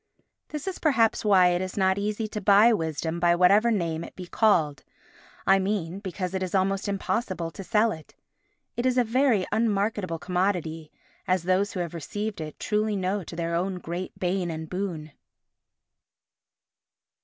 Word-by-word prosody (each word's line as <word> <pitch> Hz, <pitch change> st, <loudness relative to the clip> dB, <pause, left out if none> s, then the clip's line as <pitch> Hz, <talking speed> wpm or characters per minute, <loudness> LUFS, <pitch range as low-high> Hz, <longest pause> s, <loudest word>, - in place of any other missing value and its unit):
This 300 Hz, +3 st, -6 dB
is 380 Hz, -, -3 dB
perhaps 235 Hz, -8 st, +2 dB
why 190 Hz, -4 st, +5 dB
it 175 Hz, 0 st, 0 dB
is 185 Hz, +1 st, -5 dB
not 190 Hz, 0 st, +2 dB
easy 210 Hz, +2 st, -2 dB
to 210 Hz, -, -5 dB
buy 205 Hz, +4 st, +6 dB
Wisdom 160 Hz, -2 st, -2 dB
by 175 Hz, 0 st, +4 dB
whatever 200 Hz, +6 st, +5 dB
name 170 Hz, -7 st, -1 dB
it -, -, -10 dB
be 185 Hz, -, -7 dB
called—I 190 Hz, 0 st, 0 dB
mean, 190 Hz, -2 st, -2 dB
because 185 Hz, -2 st, -4 dB
it 190 Hz, -, -2 dB
is 185 Hz, 0 st, -2 dB
almost 195 Hz, +1 st, +1 dB
impossible 195 Hz, -3 st, -2 dB
to 195 Hz, -, -8 dB
sell 220 Hz, +3 st, +2 dB
it. 160 Hz, -4 st, -10 dB, 0.6 s
It 240 Hz, +2 st, 0 dB
is 255 Hz, 0 st, +1 dB
a 250 Hz, -, +5 dB
very 235 Hz, -4 st, +2 dB
unmarketable 210 Hz, -5 st, 0 dB
commodity, 175 Hz, -3 st, -2 dB, 0.4 s
as 185 Hz, -2 st, +1 dB
those 185 Hz, +3 st, +1 dB
who 185 Hz, -, -2 dB
have 170 Hz, -1 st, -4 dB
received 205 Hz, +5 st, -4 dB
it 155 Hz, -1 st, -7 dB
truly 210 Hz, 0 st, 0 dB
know 190 Hz, +1 st, -1 dB
to 170 Hz, -, -9 dB
their 170 Hz, 0 st, -2 dB
own 185 Hz, +3 st, -1 dB
great 175 Hz, +1 st, -6 dB
bane 180 Hz, -1 st, -1 dB
and 160 Hz, -1 st, -5 dB
boon. 175 Hz, -4 st, -4 dB
190 Hz, 165 wpm, -26 LUFS, 175-210 Hz, 0.6 s, buy